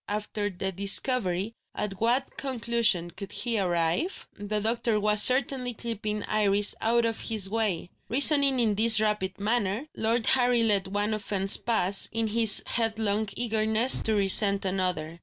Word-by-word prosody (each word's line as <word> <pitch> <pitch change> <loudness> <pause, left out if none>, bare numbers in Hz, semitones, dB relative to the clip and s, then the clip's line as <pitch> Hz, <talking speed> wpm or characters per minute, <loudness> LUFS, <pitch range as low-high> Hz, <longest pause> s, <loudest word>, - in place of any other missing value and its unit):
After 210 0 -4
this 190 0 -5
discovery, 200 0 +1 0.2
at 195 -2 -6
what 245 +4 -1
conclusion 235 -9 -1
could 195 +3 -10
he 230 -3 -3
arrive? 175 - -2
The 205 +1 -5
doctor 225 0 -1
was 210 0 +2
certainly 255 -1 +2
keeping 215 -2 -5
Iris 205 -1 0
out 235 +1 +1
of 225 -1 -3
his 215 -4 -1
way. 210 -6 -3 0.2
Reasoning 280 +1 +3
in 225 -3 +1
this 220 +1 +5
rapid 210 -3 -2
manner, 210 +2 -2
Lord 225 +1 -1
Harry 245 -2 +2
let 200 -4 +1
one 205 +2 -2
offence 200 -2 -1
pass, 200 -4 0
in 225 0 -2
his 225 -1 +5
headlong 220 -2 -2
eagerness 220 +1 +2
to 220 - -1
resent 200 0 +3
another. 180 -4 -3
215 Hz, 145 wpm, -26 LUFS, 200-230 Hz, 0.2 s, this